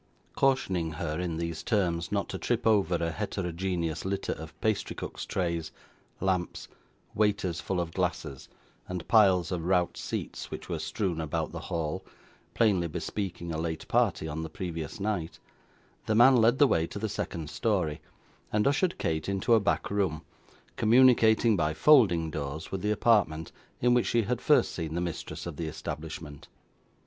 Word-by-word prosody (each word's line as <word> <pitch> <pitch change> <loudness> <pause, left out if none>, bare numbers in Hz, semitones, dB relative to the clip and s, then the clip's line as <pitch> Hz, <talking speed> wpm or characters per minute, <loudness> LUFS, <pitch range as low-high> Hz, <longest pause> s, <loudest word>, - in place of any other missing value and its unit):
Cautioning 95 -12 +1
her, 75 0 -3
in 85 -3 -2
these 85 -1 -3
terms, 85 -6 0
not 100 -1 0
to 95 - -4
trip 120 -1 -1
over 100 -6 +3
a 85 -1 -1
heterogeneous 90 -4 -2
litter 95 +1 -2
of 80 +1 -10
pastry 110 -2 -1
cook's - - -6
trays, 85 -3 -2 0.5
lamps, 95 -2 -1 0.5
waiters 100 -5 0
full 95 - -2
of 85 -1 -3
glasses, 65 - -3 0.4
and 90 -2 -5
piles 95 -6 +4
of 85 -3 -2
rout 90 -1 +2
seats - - -5
which - - -7
were 85 -3 -3
strewn 80 +2 -2
about 80 -2 -2
the - - -6
hall, 80 -3 -2 0.5
plainly 100 -7 +3
bespeaking 85 +1 -4
a 80 - -3
late 80 -1 -4
party 80 - +1
on 80 +1 -4
the 80 - -5
previous 85 -4 -5
night, 100 -5 -2 0.7
the 110 - +2
man 125 +4 +7
led 120 +1 +4
the 145 - +6
way 80 -11 +2
to - - -8
the 110 +2 -2
second 90 -6 -4
story, 95 -10 0 0.5
and 105 0 +2
ushered 155 +6 +2
Kate 80 +2 -2
into 100 +4 +1
a 115 - +7
back 100 - 0
room, 95 -6 0 0.5
communicating 115 -2 +5
by 80 -3 0
folding 90 - +5
doors 70 +2 -5
with 95 - -3
the 105 - 0
apartment 100 -7 +2 0.3
in 125 0 +3
which 120 -1 +2
she 120 -1 +2
had 120 +3 -2
first 145 -6 +4
seen 80 -2 -4
the - - 0
mistress 85 -1 -5
of 85 -4 -6
the 80 - -3
establishment. 80 -1 -7
90 Hz, 165 wpm, -29 LUFS, 80-105 Hz, 0.7 s, man